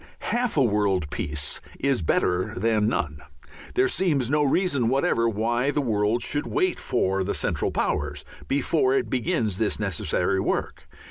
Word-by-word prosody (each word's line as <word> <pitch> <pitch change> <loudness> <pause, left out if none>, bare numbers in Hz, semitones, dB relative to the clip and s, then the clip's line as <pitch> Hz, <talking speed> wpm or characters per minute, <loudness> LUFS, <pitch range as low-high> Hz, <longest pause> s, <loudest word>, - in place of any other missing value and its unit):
Half 240 -6 0
a 140 - +5
world 100 - +1
peace 75 -1 -3 0.2
is 135 -6 +1
better 90 +3 0
than 110 +1 +2
none. 75 -9 -1 0.6
There 385 +1 +4
seems 150 - 0
no 150 0 +3
reason 140 -4 +2
whatever 120 -3 +2
why 120 +4 0
the 145 - 0
world 110 -2 +1
should 145 0 -1
wait 370 -1 0
for 95 -5 0
the 100 - -2
Central - - 0
Powers 75 -1 -2 0.2
before 140 -1 +2
it 125 -5 -1
begins 120 - 0
this 110 -2 0
necessary 100 -6 0
work. - - -2
115 Hz, 150 wpm, -25 LUFS, 100-140 Hz, 0.6 s, a